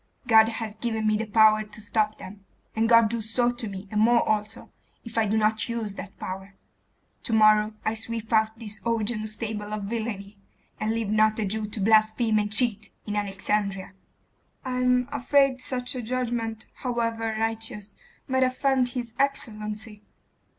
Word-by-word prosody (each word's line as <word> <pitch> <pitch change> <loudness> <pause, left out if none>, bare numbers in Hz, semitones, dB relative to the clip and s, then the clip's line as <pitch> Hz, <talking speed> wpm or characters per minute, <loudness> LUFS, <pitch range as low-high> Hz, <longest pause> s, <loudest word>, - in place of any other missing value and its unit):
God 220 -2 +6
has 225 -2 -4
given 220 0 -3
me 215 0 +3
the 220 +1 -2
power 215 0 +5
to 210 0 -10
stop 215 0 0
them; 200 +1 -11 0.3
and 225 +1 +1
God 230 -1 +7
do 230 +1 -3
so 240 +3 +1
to 240 -2 -6
me, 195 0 -8
and 210 0 +1
more 235 +1 +4
also, 210 0 -2 0.3
if 230 - -8
I 225 -1 +2
do 215 +2 +1
not 215 +1 +1
use 225 -3 -3
that 195 0 -9
power. 190 +1 -7 0.7
To 230 - -2
morrow 215 0 +5
I 220 - +1
sweep 225 0 -4
out 220 0 +2
this 215 -2 -6
Augean 225 -1 -1
stable 210 -1 -4
of 210 -1 -3
villainy, 205 -2 -5 0.4
and 215 +1 0
leave 225 -2 -2
not 215 0 +3
a 220 - 0
Jew 215 +2 -1
to 210 - -5
blaspheme 220 +2 +3
and 210 0 -2
cheat 215 -2 +2 0.2
in 210 - -3
Alexandria.' 200 -1 -2 0.7
'I 255 -1 -2
am 250 0 +2
afraid 275 0 +2
such 250 -1 -3
a 255 - -4
judgment, 235 -2 -3
however 230 -3 -2
righteous, 225 -2 -3 0.3
might 260 -1 +1
offend 260 0 +2
his 240 -2 -5
excellency. 215 -5 -2
220 Hz, 170 wpm, -26 LUFS, 210-235 Hz, 0.7 s, God